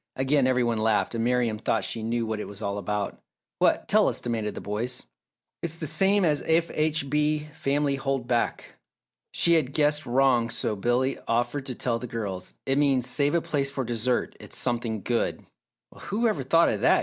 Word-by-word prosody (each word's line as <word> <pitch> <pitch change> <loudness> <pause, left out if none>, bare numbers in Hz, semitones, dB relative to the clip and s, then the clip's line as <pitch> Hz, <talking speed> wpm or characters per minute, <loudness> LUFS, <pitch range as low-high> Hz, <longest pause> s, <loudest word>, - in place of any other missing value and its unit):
Again 135 0 +2
every 125 -1 +2
one 115 -2 0
laughed, 110 +1 +1
and 115 -1 -1
Miriam 120 -3 +1
thought 115 - 0
she 115 - -4
knew 115 +1 -1
what 110 -1 -3
it - - -5
was 100 +1 -8
all 100 0 -2
about. 105 +1 -3 0.4
"What - - +2
tell - - +4
us?" - - -1
demanded 115 -3 -3
the - - -5
boys. 115 +5 -3 0.6
"It's 165 -1 -3
the 165 - -5
same 195 +5 +3
as 150 -3 +2
F. 165 +1 +2
H. 155 -1 +1
B. 150 +1 0
Family 145 -2 0
hold 135 -2 -2
back!" 120 -2 -1 0.5
She 170 - +3
had 145 -5 +2
guessed 150 0 +1
wrong 120 -2 +3
so 110 - -2
Billy 120 +6 0
offered 120 +4 0
to 130 - -3
tell 115 -1 -1
the 125 - -6
girls. 100 -6 -5
"It 135 +1 +1
means, 135 -4 +2
'Save 145 +4 +2
a 170 - +3
place 140 -3 0
for 140 -1 -3
dessert 120 +1 -1
it's - - -8
something 115 -4 -1
good!'" 120 -1 -1 0.5
"Well, - - -15
who 225 +4 +1
ever 210 -11 0
thought 165 +6 +4
of 105 - -2
that!" - - +5
125 Hz, 200 wpm, -26 LUFS, 115-145 Hz, 0.6 s, that